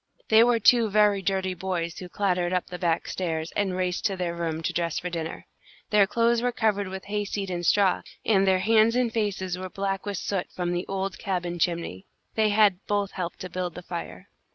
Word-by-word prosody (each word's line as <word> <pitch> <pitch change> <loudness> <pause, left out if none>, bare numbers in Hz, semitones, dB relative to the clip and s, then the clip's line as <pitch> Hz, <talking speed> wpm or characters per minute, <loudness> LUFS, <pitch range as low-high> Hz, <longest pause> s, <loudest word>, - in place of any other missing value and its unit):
They 220 +1 +7
were 240 -1 +3
two 230 +1 +5
very 205 -1 +4
dirty 190 -1 0
boys 175 -2 -3
who 180 - -8
clattered 180 -2 0
up 180 - 0
the 180 -1 -8
back 170 -2 0
stairs, 160 -3 -3
and 190 -3 0
raced 180 -1 -1
to 195 -3 +1
their 175 -2 -2
room 165 -1 -3
to - - -1
dress 170 -2 -1
for 180 - -3
dinner. 165 -1 -5 0.5
Their 205 -2 +5
clothes 230 +2 +2
were 245 0 +1
covered 210 -4 0
with 190 0 -7
hayseed 205 -1 -3
and 175 -1 -3
straw, 195 +2 +3 0.2
and 195 -3 +3
their 185 -1 +3
hands 225 +2 +4
and 245 -2 +1
faces 190 -5 -1
were 185 0 -5
black 195 +1 -3
with 200 -2 -2
soot 190 +1 -2
from 175 -1 -2
the 175 0 -2
old 195 0 -3
cabin 175 -3 -2
chimney. 165 - -2 0.3
They 220 -1 +2
had 205 -3 +4
both 205 -1 0
helped 175 -2 -5
to 185 - -5
build 180 -2 -3
the 180 - -8
fire. 95 - -7
190 Hz, 210 wpm, -26 LUFS, 175-205 Hz, 0.5 s, They